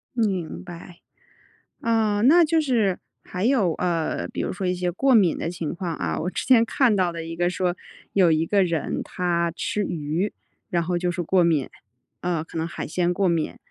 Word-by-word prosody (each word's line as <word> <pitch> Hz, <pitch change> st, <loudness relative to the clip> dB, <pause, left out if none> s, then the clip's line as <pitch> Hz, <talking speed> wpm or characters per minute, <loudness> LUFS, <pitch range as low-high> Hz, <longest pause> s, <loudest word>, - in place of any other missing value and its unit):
明 195 Hz, -8 st, -1 dB
白。 175 Hz, -1 st, -11 dB, 0.8 s
呃， 220 Hz, -3 st, +1 dB
那 330 Hz, +8 st, +6 dB
就 320 Hz, +1 st, +2 dB
是 230 Hz, -, +1 dB, 0.2 s
还 180 Hz, +1 st, -4 dB
有， 225 Hz, -9 st, +3 dB
呃， 170 Hz, -2 st, -1 dB
比 -, -, -6 dB
如 -, -, -2 dB
说 190 Hz, 0 st, -3 dB
一 180 Hz, -, +1 dB
些 180 Hz, 0 st, -1 dB
过 260 Hz, +9 st, +2 dB
敏 190 Hz, -8 st, +4 dB
的 -, -, -3 dB
情 170 Hz, -2 st, -4 dB
况 175 Hz, -2 st, -4 dB
啊 80 Hz, -, -2 dB
我 180 Hz, -, -2 dB
之 -, -, -4 dB
前 245 Hz, -4 st, +6 dB
看 235 Hz, 0 st, +2 dB
到 185 Hz, -3 st, +1 dB
的 165 Hz, -1 st, -6 dB
一 165 Hz, 0 st, -6 dB
个 175 Hz, +1 st, +1 dB
说， 180 Hz, 0 st, -1 dB, 0.4 s
有 185 Hz, -4 st, +4 dB
一 155 Hz, +1 st, +2 dB
个 200 Hz, +2 st, +3 dB
人 170 Hz, -4 st, -2 dB
他 170 Hz, -1 st, -1 dB
吃 205 Hz, +4 st, -2 dB
鱼， 165 Hz, +3 st, -2 dB, 0.4 s
然 170 Hz, -1 st, 0 dB
后 175 Hz, +1 st, -1 dB
就 180 Hz, 0 st, 0 dB
是 175 Hz, 0 st, -3 dB
过 180 Hz, +1 st, +3 dB
敏， 155 Hz, -6 st, +1 dB, 0.5 s
呃 170 Hz, -3 st, -1 dB
可 165 Hz, -, -7 dB
能 160 Hz, -, -1 dB
海 170 Hz, -, -5 dB
鲜 175 Hz, +2 st, 0 dB
过 195 Hz, 0 st, +2 dB
敏。 165 Hz, -2 st, -1 dB
180 Hz, 215 characters per minute, -24 LUFS, 170-205 Hz, 0.8 s, 那